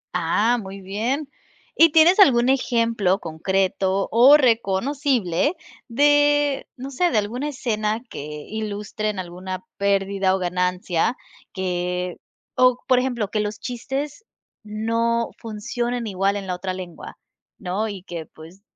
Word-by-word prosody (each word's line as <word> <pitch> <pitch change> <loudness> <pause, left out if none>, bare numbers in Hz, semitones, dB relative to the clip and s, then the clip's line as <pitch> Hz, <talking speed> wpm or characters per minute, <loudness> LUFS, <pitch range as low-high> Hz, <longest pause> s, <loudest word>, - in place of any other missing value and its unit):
Ah, 210 +8 +2
muy 195 0 -9
bien. 230 +10 -2 0.5
¿Y 330 -1 +6
tienes 325 +5 +6
algún 245 -10 +6
ejemplo 230 -7 +1
concreto 190 +3 -1
o 255 +6 +8
reconocible 245 - +1 0.3
de, 290 +2 +3
no 265 +2 -7
sé, 350 +7 +1
de 230 - 0
alguna 240 +8 -1
escena 220 -5 -1
que - - -6 0.2
ilustren 215 0 -4
alguna 185 +1 -6
pérdida 195 -1 +1
o - - 0
ganancia 180 +3 0 0.3
que 180 -1 -2 0.4
o, 255 -1 +4
por 255 -2 +4
ejemplo, 245 -5 -2
que 215 - 0
los 210 0 -3
chistes 270 - -5 0.4
no 230 +2 -1
funcionen 235 +2 -3
igual 195 -1 0
en 200 -1 -4
la 185 - -3
otra 185 +1 -4
lengua, 180 -2 -9 0.4
¿no? 200 +3 -2
Y 195 -3 -7
que, 170 -4 -7
pues, 165 +5 -15
215 Hz, 130 wpm, -22 LUFS, 190-250 Hz, 0.5 s, o